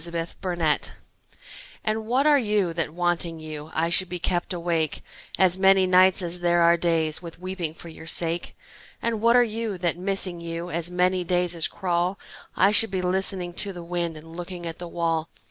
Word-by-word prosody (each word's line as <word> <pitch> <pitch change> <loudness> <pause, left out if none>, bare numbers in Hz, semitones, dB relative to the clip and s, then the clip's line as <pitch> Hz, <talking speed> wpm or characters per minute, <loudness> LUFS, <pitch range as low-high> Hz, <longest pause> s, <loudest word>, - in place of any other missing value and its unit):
The 170 - 0
Philosopher 170 -1 -1 0.9
AND 220 0 -2
what 260 +4 +2
are 295 -2 +6
you 210 -7 0
that, 165 -2 -1
wanting 170 0 -1
you, 155 -1 -8
I 165 +2 0
should 185 +1 +3
be 180 - -3
kept 175 +1 -1
awake 170 -3 -1 0.3
As 185 -1 +3
many 190 0 +5
nights 185 +1 +5
as 175 +1 -3
there 175 -1 +3
are 170 0 +6
days 165 -2 0
With 170 -2 -9
weeping 180 -3 -4
for 170 - -12
your 160 0 -11
sake? 170 +1 -1 0.4
And 230 -2 -2
what 235 +1 +5
are 245 - +7
you 225 -3 -3
that, 175 -1 -1
missing 185 -2 0
you, 170 +1 -5
As 170 0 -1
many 180 +1 +1
days 180 0 +1
as 165 -2 -1
crawl 180 +1 -1 0.4
I 195 +3 +5
should 225 +2 +4
be 190 -1 -2
listening 185 -1 0
to 200 -1 -2
the 175 -1 -8
wind 170 -1 -3
And 165 +2 -12
looking 175 0 -6
at 165 -1 -5
the 175 - -6
wall? 165 -1 -1
175 Hz, 195 wpm, -25 LUFS, 170-190 Hz, 0.9 s, are